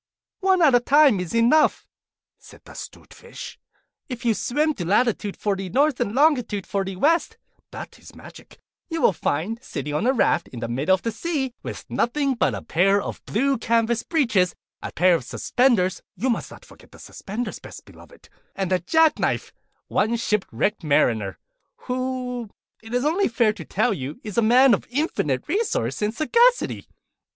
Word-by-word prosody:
'One 380 -3 +3
at 290 -4 +5
a 245 - +6
time 275 -3 +4
is 180 +3 -4
enough,' 240 +7 +3 0.5
said - - -16
the - - -13
'Stute - - -11
Fish. 475 0 -10 0.5
'If 245 -1 -6
you 230 - +3
swim 300 +8 0
to 180 - -5
latitude 205 +2 0
Fifty 195 -2 -2
North, 280 - +2
longitude 245 - +1
Forty 195 -2 -3
West 320 - +1 0.3
(that - - -9
is - - -15
magic), - - -14 0.3
you 330 -1 -3
will 205 - +4
find, 175 +9 -2
sitting 145 - -5
on 150 +11 0
a - - +5
raft, 210 -8 +1
in 120 - -9
the 115 - -3
middle 140 +11 +2
of 190 - -11
the 230 - -1
sea, 265 0 -3
with - - -7
nothing 280 +4 0
on - - +2
but - - +1
a - - -7
pair 195 +4 +2
of - - -6
blue 270 +4 0
canvas 230 0 +1
breeches, 230 - +1 0.3
a - - -6
pair 180 0 +3
of 165 - 0
suspenders 205 - +1
(you 245 +7 0
must 230 - -3
not - - -14
forget - - -18
the - - -15
suspenders, 220 +5 -6
Best - - -12
Beloved), - - -17 0.3
and 190 -2 -3
a 185 - +3
jack 320 - +3
knife, - - -1 0.3
one 220 +3 +1
ship 210 -3 0
wrecked 210 -2 -1
Mariner, 115 -9 +1 0.5
who, 250 -2 -3 0.3
it 225 0 -12
is 250 +3 0
only 345 +7 +2
fair 230 -2 +2
to 195 -6 -9
tell 140 - 0
you, 135 +3 -6
is 210 -3 -7
a 235 - +3
man 245 +3 +5
of 200 - -1
infinite 245 - -1
resource 305 - -1
and 210 +2 -1
sagacity. 475 +10 +2
230 Hz, 180 wpm, -23 LUFS, 190-275 Hz, 0.5 s, a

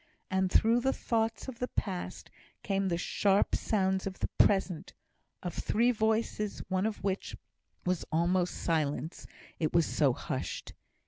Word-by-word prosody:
And 190 -1 +1
through 230 +2 +5
the 265 +2 +1
thoughts 225 -1 -1
of 255 -3 -7
the 250 - -1
past 185 -7 -4 0.3
came 195 -1 0
the 170 -2 +1
sharp 195 +3 +2
sounds 190 -2 +1
of 190 - -5
the - - -2
present 190 -4 +3 0.5
of 175 -2 -3
three 235 +3 +2
voices, 220 -2 0
one 190 +2 +1
of 215 -3 -5
which 195 -1 -2 0.5
was 180 -1 0
almost 175 +2 +2
silence, 155 0 -1 0.3
it 155 -2 0
was 170 -2 +5
so 145 -4 +3
hushed. - - -4
190 Hz, 145 wpm, -31 LUFS, 175-220 Hz, 0.5 s, through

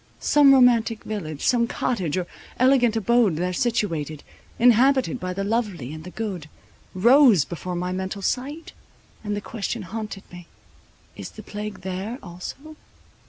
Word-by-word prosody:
Some 290 -2 +5
romantic 240 -4 +4
village, 160 -9 -5
some 235 -2 +3
cottage, 190 - -2
or 180 - -1 0.3
elegant 250 -3 +4
abode 225 -4 +2
there 180 +3 -2
situated, 165 - -1 0.3
inhabited 250 +2 +4
by 185 -3 -4
the 195 +2 -3
lovely 200 - -2
and 155 0 -9
the - - -7
good, 185 -7 -5 0.5
rose 235 - +6
before 180 +1 -6
my 180 +1 -2
mental 190 +1 -4
sight, 285 - -3 0.5
and 210 -1 -2
the 205 - -4
question 220 +1 -4
haunted 210 +1 -6
me, 175 -1 -11 0.7
is - - -7
the - - -12
plague 210 0 -7
there 190 +6 -4
also? 200 - -9
210 Hz, 145 wpm, -23 LUFS, 180-240 Hz, 0.7 s, rose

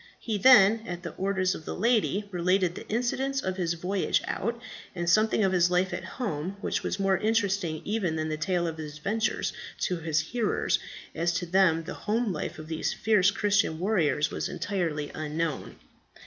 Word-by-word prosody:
He 215 -3 -2
then, 220 -2 +7
at 175 0 -5
the 170 - -5
orders 190 -1 0
of - - -8
the - - -4
lady, 210 -2 +1
related 180 0 +1
the - - -9
incidents 260 +4 0
of 185 -7 -3
his 170 -2 0
voyage 185 +3 0
out, 235 +4 -2 0.4
and 175 -1 -3
something 215 +4 +3
of 190 - +3
his 180 -1 +3
life 180 +2 +1
at - - -4
home, 185 - -4
which - - -1
was - - -3
more 195 -1 +2
interesting 200 -7 0
even 200 -6 -1
than 155 0 -2
the 155 - -2
tale 175 +2 0
of 160 -1 -4
his 150 -1 -7
adventures 220 +9 -1 0.3
to 180 - 0
his 160 -2 0
hearers, 220 +8 0 0.3
as 170 +1 0
to 175 +1 -2
them 170 -2 +3
the - - -6
home 220 -1 -1
life 150 - -4
of 155 0 -9
these 160 0 -2
fierce 205 -3 +3
Christian 205 -6 +1
warriors 170 -6 +1
was - - -3
entirely 165 -7 -2
unknown. 155 0 -3
185 Hz, 185 wpm, -28 LUFS, 165-210 Hz, 0.4 s, then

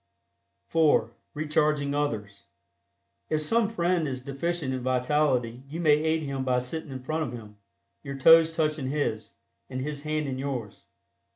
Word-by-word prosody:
(4) 150 -8 +3 0.2
RECHARGING 150 -1 +1
OTHERS. 110 -9 -3 0.8
If 155 -1 0
some 225 +6 +2
friend 175 -6 +1
is 130 -2 -5
deficient 140 +1 -2
in 130 - -3
vitality 125 -1 +1
you 160 +4 -5
may 160 -3 +4
aid 160 +1 0
him 135 -2 -3
by 130 -1 +1
sitting 145 +5 -4
in 130 -1 -7
front 155 +4 -2
of 125 - -6
him, 105 -3 -10 0.4
your 140 -1 -6
toes 165 +3 +7
touching 155 -4 -1
his, 115 -7 -2 0.4
and 130 -1 -4
his 145 +2 -4
hands 155 0 -1
in 130 -1 -3
yours. 130 -7 -5
145 Hz, 155 wpm, -27 LUFS, 130-155 Hz, 0.8 s, toes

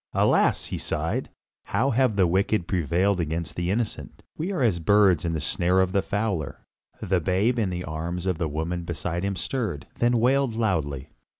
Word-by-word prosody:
"Alas!" - - +3
he - - -4
sighed, - - -2 0.4
"how 135 +3 +1
have 125 -2 +2
the 95 -2 +4
wicked 95 +1 +1
prevailed 90 +3 +1
against 80 0 -2
the 85 0 -2
innocent. 100 - -3
We 170 +5 -3
are 180 -9 0
as 100 -8 +2
birds 95 -1 +4
in 85 - -1
the 80 - -1
snare 90 +5 +1
of 95 -1 +2
the 100 - +2
fowler." 100 - -3 0.4
The 90 -1 +1
babe 100 +8 +1
in 105 -4 +1
the 90 0 -4
arms 85 +3 -4
of 90 -4 -1
the 80 - -1
woman 80 +4 -3
beside 85 +1 -3
him 100 0 -1
stirred, 100 - -3
then 120 0 +3
wailed 130 0 +2
loudly. 80 - -1
90 Hz, 185 wpm, -25 LUFS, 85-110 Hz, 0.4 s, the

